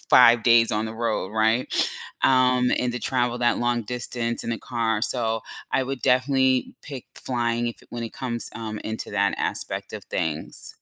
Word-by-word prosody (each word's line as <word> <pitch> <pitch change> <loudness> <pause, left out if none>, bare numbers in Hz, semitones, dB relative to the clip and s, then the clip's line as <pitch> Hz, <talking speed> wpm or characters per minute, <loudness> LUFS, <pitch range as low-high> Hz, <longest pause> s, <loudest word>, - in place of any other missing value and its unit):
5 115 -1 +7
days 115 -1 +6
on 110 -1 0
the 110 - -5
road, 115 -4 -1
right? 110 +3 +2 0.6
Um, 125 -1 +4
and 125 -1 0
to 125 - -4
travel 125 -2 0
that 120 -1 +2
long 120 0 +1
distance 120 +1 -3
in 115 - -1
a 115 - -3
car, 115 -3 -1
so 115 -3 0 0.3
I - - +3
would 135 0 -4
definitely 130 0 +2
pick 135 -4 -8
flying 120 -1 -1
if 120 - -5
when 120 -1 -4
it 115 - -7
comes, 120 -2 -3
um, 110 -2 -5
into 110 0 -4
that - - +1
aspect - - -3
of - - -7
things. 80 -1 -3
120 Hz, 175 wpm, -24 LUFS, 115-125 Hz, 0.6 s, 5